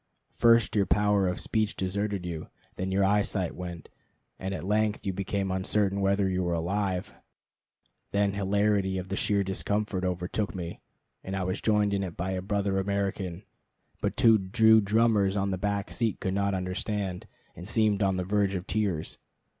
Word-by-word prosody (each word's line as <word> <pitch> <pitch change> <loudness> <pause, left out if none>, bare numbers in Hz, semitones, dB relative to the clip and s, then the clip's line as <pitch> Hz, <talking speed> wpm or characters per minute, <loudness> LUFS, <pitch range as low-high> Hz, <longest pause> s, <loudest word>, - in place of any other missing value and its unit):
First 115 -2 +4
your 100 -3 +3
power 105 -1 +3
of 90 - -2
speech 110 -2 -1
deserted 100 0 -2
you, 85 -3 -5 0.3
then 95 +1 -3
your 95 +1 +3
eyesight 100 -2 +1
went, 85 -2 -7 0.5
and 95 - -3
at 95 - -4
length 105 +2 0
you 95 - -1
became 100 0 -2
uncertain 100 +1 0
whether 100 0 +2
you 95 -1 0
were 85 -1 0
alive. 90 +2 -1 1.0
Then 100 -1 +1
hilarity 100 -1 +1
at 95 0 -5
the 100 - -2
sheer 100 0 +1
discomfort 100 0 -1
overtook 90 +1 -2
me, 85 -2 -6 0.4
and 95 - -4
I 95 - -1
was 95 +1 -2
joined 105 -2 +2
in 100 - 0
it 90 -4 -5
by 95 +2 -2
a 95 -1 -2
brother 100 0 0
American; 95 -2 -2 0.6
but - - -1
two 115 -4 +6
Jew 110 +4 +5
drummers 105 -1 +2
on 100 0 0
the 95 - -1
back 100 0 -2
seat 115 -4 -1
could 95 - -2
not 100 0 +1
understand, 95 0 -3 0.3
and 90 - -9
seemed 110 -2 +2
on 95 -2 +2
the 90 - -1
verge 100 +1 +1
of 90 -1 -4
tears. 100 -7 -2
100 Hz, 175 wpm, -28 LUFS, 95-105 Hz, 1.0 s, two